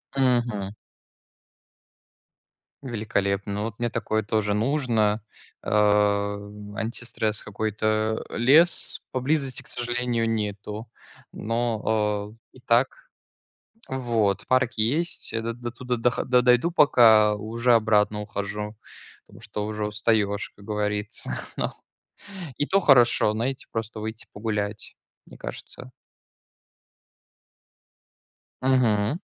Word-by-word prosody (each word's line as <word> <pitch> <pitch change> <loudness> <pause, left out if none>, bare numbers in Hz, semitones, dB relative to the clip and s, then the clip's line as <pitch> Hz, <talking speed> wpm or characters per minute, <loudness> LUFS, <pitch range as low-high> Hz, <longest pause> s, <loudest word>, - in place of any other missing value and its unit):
Мгм. 120 -7 +1 2.1
Великолепно, 100 -4 -1
ну, 105 +1 -2
вот 110 0 -5
мне 120 0 0
такое 110 -1 -1
тоже 105 0 0
нужно, 115 -3 +1 0.4
э, - - -9
антистресс, 105 +2 0
какой-то. 110 +1 -1
Лес 150 +9 +4
поблизости, 135 +1 -1
к - - -11
сожалению, 120 -1 -1
нету, 105 0 -3 0.5
но, 110 -2 -1 0.2
э, - - -16
и - - -15
так, 125 +2 +1 0.8
вот, 115 -6 0
парк 130 -2 +2
есть. 145 +11 0
Я 115 - -2
до 115 +1 -2
дотуда 120 +1 -4
дохо 120 +1 +1
до 125 0 +4
дойду 125 +7 +4
пока, 110 -9 +6
уже 115 +3 +1
обратно 105 -2 +2
ухожу, 105 +1 -4 0.5
потому - - -16
что 105 -1 -4
уже 105 0 -3
устаешь, 105 -1 0
как 100 - -15
говорится, 105 +1 -2 0.3
но - - -1 0.8
и - - 0
то 195 +4 +3
хорошо, 120 - +5
знаете, 125 +5 -2
просто 110 -1 -4
выйти 110 +1 -5
погулять, 105 -1 -4 0.3
мне - - -14
кажется. - - -8 2.7
Мгм. 130 - +2
110 Hz, 100 wpm, -25 LUFS, 105-120 Hz, 2.7 s, пока